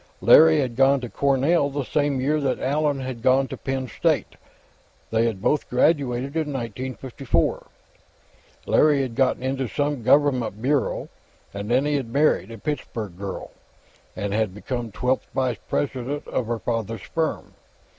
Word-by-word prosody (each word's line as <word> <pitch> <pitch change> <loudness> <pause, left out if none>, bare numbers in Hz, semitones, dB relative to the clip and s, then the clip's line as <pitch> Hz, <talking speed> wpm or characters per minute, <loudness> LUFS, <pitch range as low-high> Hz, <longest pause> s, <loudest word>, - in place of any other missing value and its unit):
Larry 160 0 +7
had 125 -3 -3
gone 135 +2 +4
to 120 - -5
Cornell 140 +4 +2
the 145 0 -3
same 145 0 0
year 150 +4 +1
that 135 -2 0
Allan 145 0 0
had 130 -3 -5
gone 130 +2 +3
to - - -5
Penn 135 -1 -3
State; - - 0 0.8
they 115 +1 +2
had 105 -4 -4
both 150 - +1
graduated 135 0 +1
in 155 -2 -1
1954. 130 - -2 1.0
Larry 145 -3 +4
had 125 -3 -4
gotten 130 +1 +1
into 130 0 -1
some 145 +6 -1
Government 130 -4 +2
bureau, 135 +3 0 0.5
and 100 +1 -5
then 130 +4 +3
he 150 0 +1
had 130 -5 -4
married 140 -6 +2
a 115 - -8
Pittsburgh 110 - -4
girl, 95 0 -6 0.6
and 100 -2 -3
had 105 -3 0
become 120 +1 -4
twelfth 125 +5 -1
vice 130 -4 0
president 140 +1 -2
of 120 - -2
her 120 0 -1
father's 115 -1 -3
firm. 160 -1 -3
130 Hz, 155 wpm, -24 LUFS, 115-145 Hz, 1.0 s, Larry